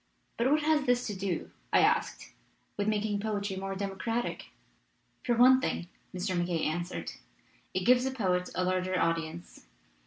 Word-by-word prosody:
"But 240 +3 +3
what 300 +1 +3
has 300 -2 +2
this 245 0 +2
to 205 - -3
do," 190 -2 -3 0.2
I - - +5
asked, - - +1 0.4
"with 205 0 -1
making 210 -1 0
poetry 205 -2 -2
more 195 0 -4
democratic?" 200 +5 -3 0.8
"For 240 - +1
one 260 +2 +7
thing," 175 - -2 0.2
Mr. 185 0 -2
MacKaye 175 -2 0
answered, 175 +3 -3 0.6
"it 185 -1 0
gives 250 +1 +5
the - - +1
poet 185 -8 0
a 185 - +1
larger 185 0 0
audience. 165 0 -2
195 Hz, 155 wpm, -30 LUFS, 180-240 Hz, 0.8 s, one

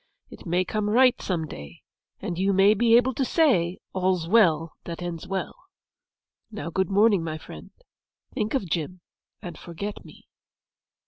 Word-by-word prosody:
It - - -12
may 180 +2 +1
come 210 +2 -2
right 250 +3 +4
some 170 -4 -2
day, 70 - -11 0.4
and 175 0 -4
you 195 +1 +2
may 195 +2 +5
be 230 +2 +4
able 250 +2 +2
to 270 - -1
say 235 - +2 0.2
"All's 185 -3 0
well 165 -6 +3
that 170 -1 -6
ends 175 -2 -6
well." 195 -1 -3 0.9
Now, 210 -6 -6
good 190 0 0
morning, 200 -2 +3
my 160 -1 -4
friend. - - -11 0.6
Think 215 +4 -2
of 205 -9 -1
Jim, 170 +2 -3 0.4
and 175 - -8
forget 200 +5 -7
me. - - -16
185 Hz, 155 wpm, -25 LUFS, 170-215 Hz, 0.9 s, may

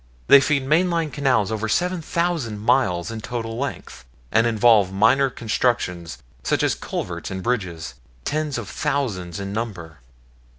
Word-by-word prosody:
They 140 - +10
feed 140 -1 +1
main 165 +6 +3
line 165 -3 -1
canals 130 -8 +1
over 110 0 -2
seven 180 - 0
thousand 160 -10 -1
miles 105 -5 +1
in 110 -1 -6
total 115 -1 -4
length, 140 - -5 0.3
and 115 +1 +4
involve 110 -4 +4
minor 135 +8 +4
constructions, 110 -8 -1 0.2
such - - 0
as - - +2
culverts - - -5
and 95 -1 -5
bridges, 95 -10 -2 0.3
tens 150 -3 -1
of 115 -4 -5
thousands 100 -11 -2
in 100 0 -5
number. 95 -8 -5
115 Hz, 145 wpm, -22 LUFS, 100-140 Hz, 0.3 s, They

